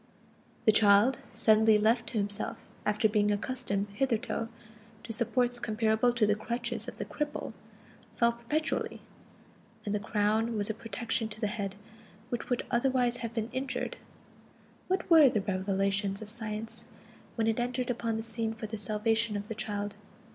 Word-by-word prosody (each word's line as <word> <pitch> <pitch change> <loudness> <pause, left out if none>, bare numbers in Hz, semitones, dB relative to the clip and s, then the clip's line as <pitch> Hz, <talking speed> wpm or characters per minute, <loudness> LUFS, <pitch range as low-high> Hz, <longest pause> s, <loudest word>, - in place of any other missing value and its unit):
The 220 - +8
child, 210 +4 +5
suddenly 220 0 +5
left 225 +2 +2
to 230 - -2
himself 205 0 -2 0.3
after 210 +1 +3
being 210 -1 +2
accustomed 205 -2 -1
hitherto 230 -1 -1 0.5
to 225 - -4
supports 245 +1 +1
comparable 220 +1 +2
to 235 -3 +3
the 210 - +3
crutches 235 +1 -3
of - - -7
the - - -3
cripple, 300 -1 -4 0.6
fell 235 0 +4
perpetually, 275 +7 -2 0.9
and 205 - -1
the 210 - +1
crown 215 +2 +1
was 205 +1 0
a - - -4
protection 225 0 -2
to 215 0 -6
the 220 - 0
head, 205 -2 -3 0.5
which 240 - -3
would 245 - 0
otherwise 245 0 +2
have 230 -1 -5
been 225 0 -2
injured. 260 -1 -3 0.9
What 375 0 0
were 320 -5 +8
the 215 -4 0
revelations 195 +1 0
of 215 -1 -6
Science, 225 0 -5 0.5
when 225 - +1
it 225 +1 +1
entered 245 +1 0
upon 230 -2 -1
the 220 - -3
scene 225 0 -3
for 220 - -6
the 220 0 -5
salvation 215 +1 +1
of 205 +1 -6
the - - -2
child? 205 -2 -3
225 Hz, 160 wpm, -30 LUFS, 210-240 Hz, 0.9 s, The